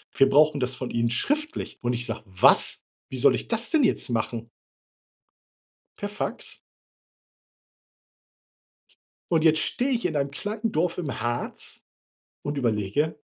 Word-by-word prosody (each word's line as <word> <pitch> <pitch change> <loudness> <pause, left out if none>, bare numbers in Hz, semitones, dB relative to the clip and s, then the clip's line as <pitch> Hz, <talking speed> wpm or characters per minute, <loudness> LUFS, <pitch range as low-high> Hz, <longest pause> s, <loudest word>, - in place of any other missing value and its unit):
Wir 135 - +5
brauchen 150 +1 +5
das 125 0 0
von 125 0 -5
ihnen 115 0 +1
schriftlich.“ 300 - -1
Und 120 0 0
ich 120 0 -2
sage: 115 -3 -4
„Was? 95 -1 +4 0.3
Wie 130 - -5
soll 130 - +5
ich - - -3
das 230 0 -1
denn 315 -3 +4
jetzt 220 - +1
machen?“ 115 0 -2 1.5
Per 205 - -3
Fax. 205 +1 -4 2.7
Und 160 -2 +3
jetzt 160 -1 +5
stehe 255 - 0
ich 240 -5 0
in 165 -3 0
einem 140 -1 0
kleinen 210 +8 -3
Dorf 170 0 0
im 150 -9 -3
Harz 120 +1 -3 0.6
und 145 0 -3
überlege, 120 +6 0
145 Hz, 140 wpm, -26 LUFS, 120-205 Hz, 2.7 s, Wir